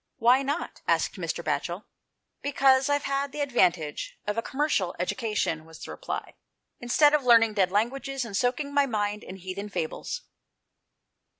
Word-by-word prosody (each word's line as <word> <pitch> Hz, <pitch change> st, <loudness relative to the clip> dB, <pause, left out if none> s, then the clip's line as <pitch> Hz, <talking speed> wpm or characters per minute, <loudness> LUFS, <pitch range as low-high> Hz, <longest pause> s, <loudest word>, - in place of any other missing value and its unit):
"Why 250 Hz, +2 st, +5 dB
not?" 285 Hz, +5 st, -3 dB
asked -, -, +1 dB
Mr. -, -, -3 dB
Batchel. -, -, -2 dB, 0.6 s
"Because 270 Hz, -1 st, +3 dB
I've 285 Hz, 0 st, +1 dB
had 275 Hz, 0 st, -1 dB
the 295 Hz, -, -4 dB
advantage 180 Hz, -, +1 dB
of 210 Hz, -, -1 dB
a 230 Hz, -, 0 dB
commercial 265 Hz, -, 0 dB
education," 180 Hz, -4 st, -1 dB
was 160 Hz, 0 st, -13 dB
the -, -, -7 dB
reply, -, -, -5 dB, 0.2 s
" -, -, -55 dB
instead 290 Hz, +5 st, +4 dB
of 300 Hz, -2 st, +3 dB
learning 230 Hz, -3 st, +6 dB
dead 190 Hz, -3 st, +2 dB
languages 265 Hz, +5 st, -1 dB
and 210 Hz, -4 st, -6 dB
soaking 255 Hz, +6 st, 0 dB
my 285 Hz, -1 st, +3 dB
mind 210 Hz, -3 st, -1 dB
in 185 Hz, -, -8 dB
heathen 190 Hz, +2 st, -6 dB
fables." 185 Hz, -, -4 dB
240 Hz, 160 wpm, -27 LUFS, 200-275 Hz, 0.6 s, learning